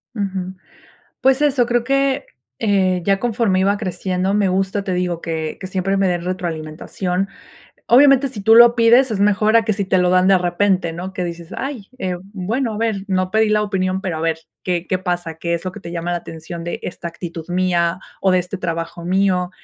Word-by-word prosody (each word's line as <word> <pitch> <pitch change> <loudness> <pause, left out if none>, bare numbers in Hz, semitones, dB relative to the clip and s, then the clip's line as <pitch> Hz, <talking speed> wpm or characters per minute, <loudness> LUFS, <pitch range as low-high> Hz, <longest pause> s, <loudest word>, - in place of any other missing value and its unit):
Ujú. 190 -3 -3 0.7
Pues 265 +1 +3
eso, 275 -4 +3
creo 240 0 +1
que, 275 +1 +1 0.3
eh, 190 -4 +2
ya 195 -1 +2
conforme 220 -4 +1
iba 200 +2 +2
creciendo, 185 -1 -2
me 205 -2 +2
gusta, 195 +2 0
te 190 -2 -2
digo, 180 -2 -1
que 160 -1 -4
que 185 - -6
siempre 190 +1 -1
me 195 0 +2
den 175 -1 -1
retroalimentación. 180 +2 -3 0.6
Obviamente, 275 +2 +6
si 235 -5 -8
tú 220 +3 +5
lo 235 0 +8
pides 240 +2 +5
es 210 -3 -2
mejor 210 +2 +3
a 230 - +4
que 215 - +1
si 200 0 -2
te 190 0 +2
lo 180 0 +3
dan 185 0 +4
de 195 -1 +5
repente, 180 0 +1
¿no?, 180 +3 -6
que 185 - -4
dices: 170 -1 -7
"Ay, 265 -7 -5
eh, 185 -6 -2 0.2
bueno, 220 +5 -2
a - - -5
ver, 220 -3 -1
no 185 -1 0
pedí 220 +1 +3
la 210 0 +3
opinión, 190 -2 -1
pero 185 -5 -3
a - - -4
ver 165 0 0 0.3
qué 180 -1 -1
qué 185 - +1
pasa, 175 -3 -3
qué 170 +2 -2
es 170 - -4
lo 185 - -2
que 210 - -9
te 170 -2 -8
llama 170 0 -3
la - - 0
atención 165 +1 -8
de 175 - -4
esta 175 - -6
actitud 170 -1 -7
mía 175 -1 +1 0.2
o 190 - +3
de 185 - +4
este 180 +3 -5
trabajo 170 -1 -4
mío". 185 0 +1
185 Hz, 215 wpm, -19 LUFS, 175-210 Hz, 0.7 s, lo